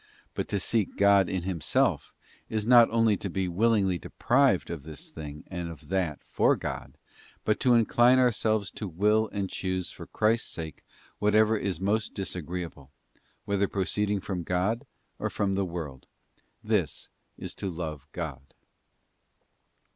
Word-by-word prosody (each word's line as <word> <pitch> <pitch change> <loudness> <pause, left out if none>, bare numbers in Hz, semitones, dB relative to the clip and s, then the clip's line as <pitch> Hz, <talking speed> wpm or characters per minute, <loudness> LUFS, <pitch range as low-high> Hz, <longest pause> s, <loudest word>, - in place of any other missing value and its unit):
But - - -3
to 100 - -1
seek 110 +1 0
God 100 -2 +5
in 95 -2 -2
Himself 90 -4 0 0.4
is 110 -1 -1
not 120 -1 +7
only 115 -2 +3
to 100 - -4
be 95 +1 -1
willingly 95 -1 +2
deprived 130 - +2
of 85 -4 -5
this 75 +1 -9
thing 75 -1 -8
and 90 -2 -5
of 80 -2 -11
that 90 -6 -1
for - - +3
God, - - -6 0.5
but 105 -1 +2
to 125 -2 +4
incline 120 +2 +5
ourselves 110 -5 +2
to 105 - -5
will 105 +5 +2
and 100 -1 -2
choose 95 -1 -3
for - - -10
Christ's 110 +2 +1
sake 80 -3 -6 0.4
whatever 110 +1 +4
is 100 -5 -2
most 105 +3 0
disagreeable, 90 -6 -5 0.6
whether 100 0 +1
proceeding 100 +2 0
from 95 -2 -4
God 90 +7 -1 0.3
or - - -1
from 100 -1 -1
the 100 0 +1
world; 80 -7 -6 0.6
this - - -1 0.3
is - - -6
to 100 - -4
love 80 -5 -5
God. 70 -6 -6
95 Hz, 145 wpm, -28 LUFS, 85-110 Hz, 0.6 s, not